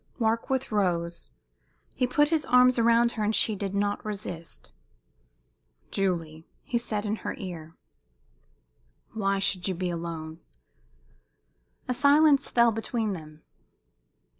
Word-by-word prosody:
Warkworth 230 +3 0
rose. 170 - -1 0.6
He 250 - 0
put 295 +4 +2
his 315 -2 +1
arms 250 0 +5
round 235 +1 +4
her, 220 - -3
and 215 +1 +1
she 215 - +3
did 200 0 -4
not 205 0 -1
resist. 195 -6 -7 1.2
"Julie," 165 -5 -2 0.2
he 245 -5 -1
said 215 -3 -3
in 215 +1 -1
her - - -5
ear, 170 -4 -8 1.4
"why 200 -3 0
should 190 -1 0
you 190 - -1
be 180 0 -2
alone?" 165 -1 -6 1.5
A 250 - 0
silence 285 +2 +4
fell 235 -1 +4
between 225 -1 -2
them. 155 -3 -10
205 Hz, 120 wpm, -27 LUFS, 175-235 Hz, 1.5 s, arms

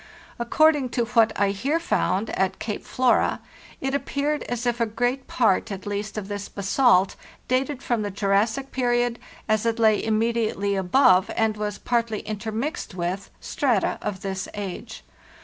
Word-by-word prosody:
According 290 +2 +3
to 240 - +2
what 230 -1 +3
I 200 -1 +3
here 275 +11 0
found 225 - 0
at 190 0 0
Cape 210 -2 -4
Flora, 255 -1 +2 0.4
it 270 0 -1
ap 280 -1 -1
peared 290 +1 -1
as 245 0 -3
if 240 0 0
a 230 - +2
great 245 +4 -1
part 225 -2 +2
at 195 -1 -6
least 205 +1 -4
of 200 -2 -4
this 205 -1 -5
basalt 200 -1 +3 0.3
dated 260 +2 0
from 240 -3 0
the 205 - -2
Jurassic 210 +7 0
period, 240 -2 +1 0.3
as 215 -1 +2
it 230 0 0
lay 220 -2 +3
immediately 220 -2 0
above, 190 0 +4
and 220 -1 +1
was 210 -1 -3
partly 230 -3 -1
intermixed 220 - -4
with, 180 +2 -3
strata 245 -9 0
of 195 -2 -4
this 190 0 -3
age. 205 +3 -6
225 Hz, 160 wpm, -24 LUFS, 200-245 Hz, 0.4 s, above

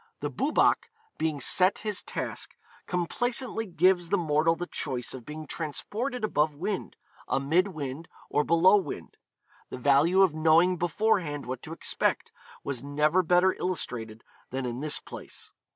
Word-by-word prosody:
The - - -2
Boobach - - +2 0.3
being 155 -2 -1
set 185 +8 +4
his 210 -2 +1
task, - - -5 0.3
complaisantly 225 +6 -1
gives 175 0 +2
the 200 - +3
mortal 160 -1 +2
the 175 - -4
choice 130 -8 -4
of 125 -3 -10
being 155 +1 -7
transported 220 - -4
above 150 -7 +1
wind, 190 +6 -4 0.3
amid 160 +8 +2
wind, 155 -3 -6 0.2
or 150 - +1
below 175 +6 +5
wind. 195 - -5 0.5
The - - -6
value 145 +9 +4
of 185 -5 +3
knowing 165 +3 +4
beforehand 175 -4 0
what 130 0 -5
to 155 - -10
expect, 165 - -1 0.3
was 135 -3 -3
never 150 +5 +2
better 180 +2 +3
illustrated 120 -11 -4 0.3
than 130 0 -3
in 120 0 -4
this 150 +1 +2
place. - - -10
165 Hz, 145 wpm, -28 LUFS, 145-185 Hz, 0.5 s, below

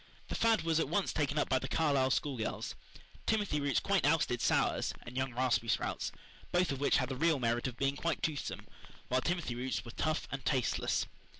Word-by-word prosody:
The - - -3
fad 225 -1 +3
was 165 -1 +2
at - - 0
once 200 - 0
taken 145 -1 0
up 150 - +2
by 130 - +2
the 130 - -4
Carlisle 140 -4 +2
schoolgirls. 130 -4 -1 0.5
Timothy 205 -9 +1
roots 140 -2 +2
quite 200 -2 +1
ousted 145 -5 +2
"sours" - - +2
and 120 - -10
young 130 0 0
raspberry 125 -2 +1
sprouts, - - 0 0.4
both 175 -2 +2
of 135 - -3
which 140 - +3
had 125 -2 0
the 135 - -2
real 160 +2 +3
merit 120 0 0
of 125 -2 -6
being 135 0 +1
quite 170 +3 -2
toothsome, 150 -3 -2 0.4
while 130 +1 +2
timothy 170 -6 -1
roots 125 +2 -3
were 120 - -7
tough 155 +5 -1
and 135 -2 -4
tasteless. 130 -1 +1
140 Hz, 200 wpm, -33 LUFS, 130-160 Hz, 0.5 s, fad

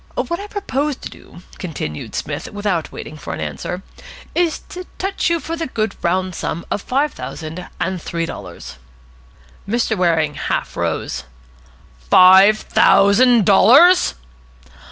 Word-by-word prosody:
"What 340 +1 -2
I 405 - -7
propose 300 -9 -2
to - - -9
do," 175 - -15 0.2
continued 145 - -6
Psmith, - - -5
without 205 -5 -2
waiting 155 - -9
for - - -7
an - - -9
answer, 80 - -5 0.5
"is 340 -2 +1
to 365 0 -8
touch 390 -1 -1
you 335 0 +1
for 325 +3 -5
the 330 -1 -4
good 215 -5 -2
round 185 +1 0
sum 170 0 -4
of 205 - -1
five 280 +7 0
thousand 155 +7 -7
and 185 -1 -2
three 165 0 -3
dollars." 65 - -9 0.9
Mr. 230 0 0
Waring 165 -5 +1
half - - -3
rose. 70 +2 -3 0.8
"Five 190 +3 +7
thousand 220 +3 +4
dollars!" 275 - +6
200 Hz, 135 wpm, -19 LUFS, 170-280 Hz, 0.9 s, Five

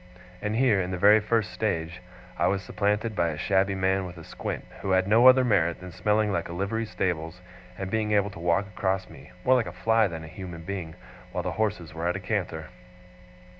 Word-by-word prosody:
And 105 +1 -2
here, 115 -5 +3
in 90 - -3
the 95 - -3
very 105 +4 +6
first 110 -2 0
stage, 85 +2 -2 0.3
I - - +2
was 100 0 0
supplanted 105 +3 -1
by 85 -3 +2
a 75 - -4
shabby 95 +3 +1
man 95 0 +1
with 90 -1 -8
a 80 - -10
squint, - - -5 0.2
who 100 - -3
had 95 0 +3
no 115 +4 +6
other 130 0 +7
merit 85 -7 +2
than 90 0 -9
smelling 105 +1 +1
like 95 - -2
a - - -5
livery 100 +5 -2
stables, 90 -3 -2 0.4
and 95 -1 -5
being 110 -1 0
able 100 -1 +2
to 85 - -11
walk 85 +3 +1
across 95 -1 -2
me, - - -14
more 130 - +5
like 125 -5 +2
a - - -5
fly 110 +4 +2
than 80 -3 -7
a - - -9
human 85 0 -8
being, 90 -4 -5 0.4
while 90 - -3
the 90 - -2
horses 105 -7 -2
were 80 +1 -3
at 90 - 0
a - - -3
canter! 90 -5 -3
95 Hz, 220 wpm, -27 LUFS, 85-105 Hz, 0.4 s, other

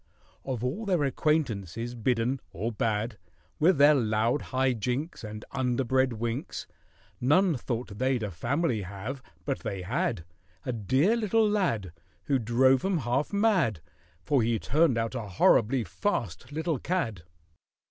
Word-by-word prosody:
Of 125 -4 -3
all 175 - -2
their 180 -6 +2
acquaintances 120 - -1
bidden 120 +2 0
(or 110 +7 -2
bad) 110 0 -1 0.4
With 170 +2 +4
their 145 +2 +7
loud 115 +1 +1
high 130 0 +1
jinks 125 +8 -3
And 105 0 -7
underbred 130 0 +1
winks, 115 +4 -4 0.5
None 160 +7 +3
thought 115 -4 -4
they'd 130 -2 +1
a 105 - -3
family 120 - 0
have—but 125 +8 -6
they 95 -2 -4
had; 85 -2 -1 0.4
A 125 - -1
dear 130 - +2
little 225 -1 +2
lad 170 - 0 0.3
Who 135 -2 +1
drove 125 +3 +3
'em 190 -2 +1
half 130 +1 -1
mad, 200 - +2 0.4
For 135 +7 +2
he 115 0 +1
turned 150 0 +2
out 115 +1 -1
a 115 -5 -4
horribly 115 +6 +3
fast 90 - -3
little 160 -1 -1
cad. 115 - -2
125 Hz, 135 wpm, -28 LUFS, 110-145 Hz, 0.5 s, their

